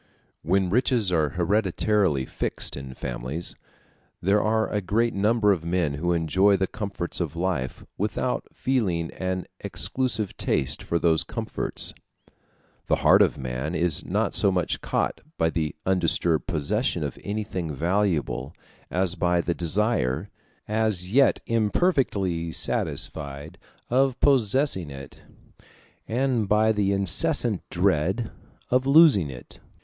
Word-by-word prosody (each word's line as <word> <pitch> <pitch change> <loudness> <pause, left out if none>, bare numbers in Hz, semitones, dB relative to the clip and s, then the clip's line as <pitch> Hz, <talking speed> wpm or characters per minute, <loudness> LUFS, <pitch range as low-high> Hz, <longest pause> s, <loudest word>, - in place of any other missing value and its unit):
When 95 +2 +1
riches 120 -3 +2
are 80 -4 +2
hereditarily 95 -4 +1
fixed - - -3
in 65 -2 -8
families, 65 +7 -2 0.7
there 100 +3 +2
are 110 +1 +1
a 105 - -2
great 115 +5 0
number 105 +1 +2
of 90 -5 0
men 85 -3 0
who 85 +5 -1
enjoy 95 +5 +3
the 95 - +1
comforts 100 -3 -4
of 85 -3 -3
life 85 -7 -2
without - - -2
feeling 95 -11 -1
an 95 -1 -3
exclusive 125 -6 -2
taste 65 - 0
for 85 - -1
those 80 -2 +3
comforts. - - -3 0.9
The - - +3
heart - - +7
of - - +3
man 65 +5 -4
is 85 -2 +2
not - - -1
so 100 - +3
much 90 -2 -1
caught - - -1 0.2
by 80 0 +1
the 80 -3 -2
undisturbed 85 -4 +1
possession 90 - -1
of 70 - -5
anything 100 -5 -3
valuable 85 +2 -1 0.3
as 90 -1 0
by 90 -1 +1
the 85 0 0
desire, 85 - 0 0.4
as 105 -4 -1
yet 135 +1 +4
imperfectly 105 - 0
satisfied, 70 -1 -3 0.3
of 130 0 +2
possessing 130 - +2
it, 70 -1 -10 0.9
and 120 -3 0
by 110 +1 +4
the 105 -2 +1
incessant 100 -3 +2
dread 95 +10 0 0.4
of 130 +1 +2
losing 140 - +6
it. 65 -2 -11
95 Hz, 125 wpm, -25 LUFS, 80-110 Hz, 0.9 s, heart